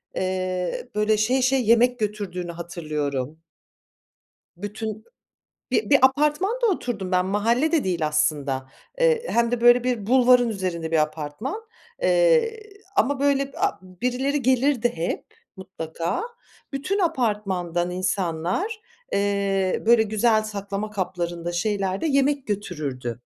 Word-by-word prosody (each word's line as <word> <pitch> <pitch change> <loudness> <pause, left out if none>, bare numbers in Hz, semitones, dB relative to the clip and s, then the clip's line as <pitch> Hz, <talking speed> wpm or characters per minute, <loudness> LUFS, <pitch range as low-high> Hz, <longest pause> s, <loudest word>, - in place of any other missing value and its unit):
eee, 185 - -2
böyle, 210 0 +2
şey 245 +5 +2
şey, 260 0 +2
yemek 245 +2 +4
götürdüğünü 200 -5 -3
hatırlıyorum. 155 -5 -4 1.2
Bütün 215 +2 -5 0.7
bi 435 - 0
bir 280 - +7
apartmanda 300 - +3
oturdum 235 - -2
ben, 180 0 +2
mahalle 230 - +1
de 320 -4 +2
değil 170 -4 0
aslında. 145 -3 0 0.3
Eee, 485 -1 +2
hem 235 0 +2
de, 245 -1 -1
böyle, 240 +1 +6
bir 240 -5 -1
bulvarın 250 -1 +5
üzerinde 180 -6 -3
bir 165 - +2
apartman, 155 - -3 0.4
eee, 485 -3 +3 0.4
ama, 285 -7 +2
böyle, 275 -1 +1
b - - -11
aaa, 400 +1 0
birileri 250 +10 -2
gelirdi 255 -1 +2
hep 165 +1 -2 0.3
mutlaka. 170 - -4 0.5
Bütün 285 +9 -1
apartmandan 205 - 0
insanlar, 185 - -1 0.3
eee, 200 -2 0
böyle, 235 -1 +6
güzel 220 +1 +2
saklama 205 0 -4
kaplarında, 175 -3 -3
şeylerde 195 - -1
yemek 280 -1 +1
götürürdü. 145 - -4
210 Hz, 120 wpm, -24 LUFS, 180-265 Hz, 1.2 s, bir